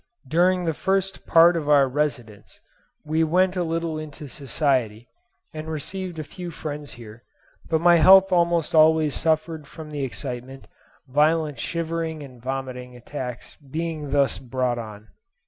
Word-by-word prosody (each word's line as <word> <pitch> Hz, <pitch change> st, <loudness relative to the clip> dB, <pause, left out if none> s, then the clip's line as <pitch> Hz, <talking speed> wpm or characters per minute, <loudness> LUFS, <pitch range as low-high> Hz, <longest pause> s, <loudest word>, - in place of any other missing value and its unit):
During 180 Hz, +4 st, +2 dB
the 165 Hz, -, 0 dB
first 195 Hz, +4 st, -1 dB
part 170 Hz, +1 st, +6 dB
of 150 Hz, -3 st, -2 dB
our 140 Hz, -2 st, +5 dB
residence 130 Hz, -7 st, -4 dB, 0.5 s
we 160 Hz, +2 st, +1 dB
went 180 Hz, +3 st, +2 dB
a 180 Hz, -, 0 dB
little 165 Hz, -1 st, -2 dB
into 150 Hz, -1 st, -8 dB
society, 130 Hz, -5 st, -1 dB, 0.5 s
and 155 Hz, 0 st, -7 dB
received 180 Hz, +3 st, -4 dB
a 155 Hz, -, -4 dB
few 175 Hz, +4 st, -8 dB
friends 150 Hz, -3 st, -6 dB
here; 115 Hz, -1 st, -12 dB, 0.5 s
but 160 Hz, -1 st, +1 dB
my 175 Hz, 0 st, +6 dB
health 190 Hz, +3 st, +7 dB
almost 170 Hz, -2 st, +2 dB
always 155 Hz, -1 st, +5 dB
suffered 160 Hz, -1 st, -1 dB
from 155 Hz, 0 st, -10 dB
the 145 Hz, -2 st, -3 dB
excitement, 130 Hz, 0 st, -6 dB, 0.4 s
violent 150 Hz, +2 st, +1 dB
shivering 165 Hz, -2 st, -3 dB
and 130 Hz, -4 st, -13 dB
vomiting 130 Hz, -1 st, -5 dB
attacks 125 Hz, 0 st, -7 dB
being 155 Hz, +1 st, -5 dB
thus 140 Hz, -1 st, +1 dB
brought 125 Hz, -1 st, -2 dB
on. 110 Hz, -1 st, -9 dB
155 Hz, 145 wpm, -24 LUFS, 130-165 Hz, 0.5 s, health